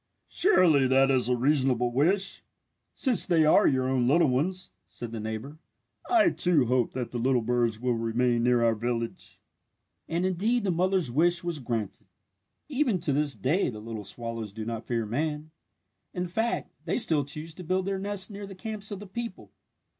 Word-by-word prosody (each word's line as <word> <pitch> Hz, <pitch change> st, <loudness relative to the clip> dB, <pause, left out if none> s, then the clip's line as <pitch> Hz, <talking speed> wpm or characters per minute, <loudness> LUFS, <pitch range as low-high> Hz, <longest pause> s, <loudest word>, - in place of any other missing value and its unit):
"Surely 165 Hz, -, +4 dB
that 135 Hz, +1 st, +4 dB
is 125 Hz, -2 st, +1 dB
a 125 Hz, -, +3 dB
reasonable 130 Hz, -2 st, +1 dB
wish 185 Hz, +10 st, +1 dB, 0.5 s
since 250 Hz, -8 st, +2 dB
they 165 Hz, -3 st, +3 dB
are 155 Hz, -, +5 dB
your 130 Hz, -1 st, +1 dB
own 130 Hz, -2 st, +1 dB
little 165 Hz, +4 st, +4 dB
ones," 175 Hz, +9 st, -1 dB, 0.2 s
said 120 Hz, -2 st, -8 dB
the 115 Hz, -, -5 dB
neighbour. 110 Hz, +8 st, -6 dB, 0.5 s
"I, 345 Hz, -2 st, +4 dB
too, 170 Hz, -7 st, +3 dB
hope 125 Hz, 0 st, 0 dB
that 125 Hz, -2 st, -4 dB
the 120 Hz, -, -3 dB
little 125 Hz, 0 st, +1 dB
birds 120 Hz, -2 st, 0 dB
will 125 Hz, 0 st, 0 dB
remain 115 Hz, +1 st, 0 dB
near 120 Hz, 0 st, +3 dB
our 115 Hz, -, +3 dB
village!" 115 Hz, +1 st, -4 dB, 0.7 s
And 170 Hz, +2 st, -1 dB
indeed 210 Hz, +6 st, +1 dB
the 195 Hz, -, +1 dB
mother's 180 Hz, -4 st, +1 dB
wish 170 Hz, +6 st, +2 dB
was 170 Hz, -3 st, -1 dB
granted. 115 Hz, -5 st, -4 dB, 0.6 s
Even 270 Hz, -7 st, 0 dB
to 150 Hz, -4 st, -1 dB
this 145 Hz, -2 st, 0 dB
day 140 Hz, -, 0 dB
the 110 Hz, -, -7 dB
little 110 Hz, 0 st, -7 dB
swallows 115 Hz, -1 st, -5 dB
do 110 Hz, 0 st, -6 dB
not 115 Hz, -1 st, -5 dB
fear 115 Hz, -2 st, -1 dB
man. 150 Hz, +6 st, -3 dB, 0.6 s
In 180 Hz, 0 st, -2 dB
fact, 225 Hz, +7 st, -2 dB
they -, -, -1 dB
still 160 Hz, -, +3 dB
choose 150 Hz, +4 st, -5 dB
to 180 Hz, -, -10 dB
build 185 Hz, +2 st, -1 dB
their 195 Hz, -1 st, -2 dB
nests 200 Hz, -1 st, -1 dB
near 205 Hz, -1 st, -8 dB
the 195 Hz, -, -10 dB
camps 215 Hz, +1 st, -5 dB
of 205 Hz, -, -5 dB
the 205 Hz, -, -9 dB
people. 230 Hz, +4 st, -7 dB
145 Hz, 185 wpm, -27 LUFS, 120-185 Hz, 0.7 s, are